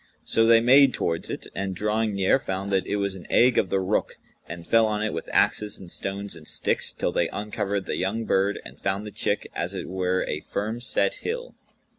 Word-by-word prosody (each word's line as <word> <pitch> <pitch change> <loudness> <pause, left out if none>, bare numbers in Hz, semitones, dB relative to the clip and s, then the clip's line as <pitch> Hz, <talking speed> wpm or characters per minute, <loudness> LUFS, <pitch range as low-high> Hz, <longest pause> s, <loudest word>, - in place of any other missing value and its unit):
So 115 0 +2
they 115 0 +7
made 135 +3 +6
towards 85 -1 -2
it - - -5
and 95 -1 -3
drawing 105 +2 0
near, 95 +7 +3
found 95 -3 -4
that 95 -1 +1
it - - -1
was 100 -1 -1
an 90 - -11
egg 125 0 +5
of 95 - 0
the 95 - +1
Rukh 95 +3 -1 0.3
and 85 +1 -7
fell 115 -1 +4
on 105 0 -1
it 110 - -1
with - - -5
axes 105 -1 +2
and 90 -2 -11
stones 100 +1 -4
and 80 -2 -13
sticks - - +1
till - - -2
they - - +1
uncovered 100 -2 -3
the - - -3
young 105 +5 -1
bird 100 0 +1
and - - -12
found 95 +2 -1
the 105 - -7
chick - - -2
as - - -3
it - - -5
were 95 0 0
a 75 - -2
firm 110 +8 -4
set 480 - +1
hill. 485 +2 -4
100 Hz, 220 wpm, -25 LUFS, 95-115 Hz, 0.3 s, they